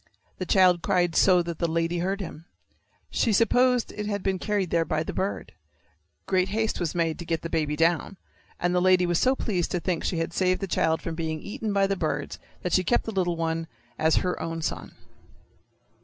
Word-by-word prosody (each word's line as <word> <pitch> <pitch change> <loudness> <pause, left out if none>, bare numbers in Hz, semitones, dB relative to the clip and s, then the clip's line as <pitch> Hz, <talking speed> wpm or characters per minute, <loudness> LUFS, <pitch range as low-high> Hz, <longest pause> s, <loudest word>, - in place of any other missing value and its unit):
The 185 - -3
child 180 -2 +4
cried 175 -3 +1
so 180 -2 +5
that 170 -1 -6
the 170 - +1
lady 165 +1 0
heard 195 +3 -1
him. 165 -3 -8 0.7
She 230 - +1
supposed 245 +3 +3
it 210 0 -5
had 205 -2 -2
been 190 -1 0
carried 205 -4 -1
there 165 -1 +3
by 155 -1 -1
the - - -5
bird. 195 +2 -3 0.7
Great 185 0 +1
haste 220 +2 -1
was 170 -2 -2
made 165 -2 0
to - - -5
get 165 -1 -2
the 165 - -5
baby 150 -2 0
down, 165 +4 +1 0.4
and 175 0 0
the 180 - +2
lady 185 0 +4
was 175 -1 +1
so 260 +1 +3
pleased 185 -10 -1
to 180 - -1
think 175 -2 -2
she 175 - -1
had 165 +1 -2
saved 185 -1 +1
the 195 - -2
child 160 -3 0
from 165 - -3
being 160 -1 -3
eaten 210 +4 -4
by 200 -1 +3
the 195 0 0
birds 155 -5 -3 0.2
that 180 - -2
she 185 - +4
kept 240 +7 +2
the 225 - -4
little 180 -4 0
one 165 0 -2 0.3
as 160 0 +3
her 180 - -2
own 165 -1 -4
son. - - -4
180 Hz, 215 wpm, -26 LUFS, 165-195 Hz, 0.7 s, so